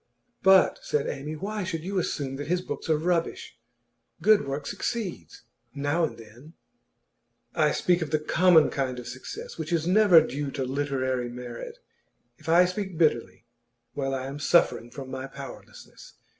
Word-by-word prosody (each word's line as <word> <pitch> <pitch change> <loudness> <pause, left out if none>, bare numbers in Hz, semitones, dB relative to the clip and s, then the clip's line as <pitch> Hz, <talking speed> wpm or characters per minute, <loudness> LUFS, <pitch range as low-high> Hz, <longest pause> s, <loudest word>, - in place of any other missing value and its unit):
'But,' 190 -1 +5
said 145 - -1
Amy, 150 +3 -4
'why 205 +5 -4
should 165 -3 -4
you 190 +1 -1
assume 135 -6 -3
that 145 0 -5
his 180 +2 +1
books - - -6
are 155 - +4
rubbish? 165 -6 -2 0.6
Good 205 -3 +4
work 140 +1 -4
succeeds 200 - -4 0.3
now 145 +4 0
and - - -7
then.' 115 +8 -14 1.0
'I - - +3
speak 180 -1 +2
of 160 - -2
the 155 - +2
common 160 +1 +4
kind 130 -2 -2
of 125 - -8
success, 460 - -8
which - - -4
is 165 -2 +1
never 185 -1 +7
due 145 -2 -2
to 135 - -2
literary 130 -2 -1
merit. 120 -1 -8
And 120 0 -43
if - - -9
I 175 +2 +6
speak 185 -1 -4
bitterly, 150 -8 +1 0.5
well, 135 -1 -2
I 130 0 -4
am 140 +2 -6
suffering 145 -6 +2
from 135 0 -9
my 130 0 -5
powerlessness. 140 0 -12
150 Hz, 165 wpm, -27 LUFS, 135-180 Hz, 1.0 s, never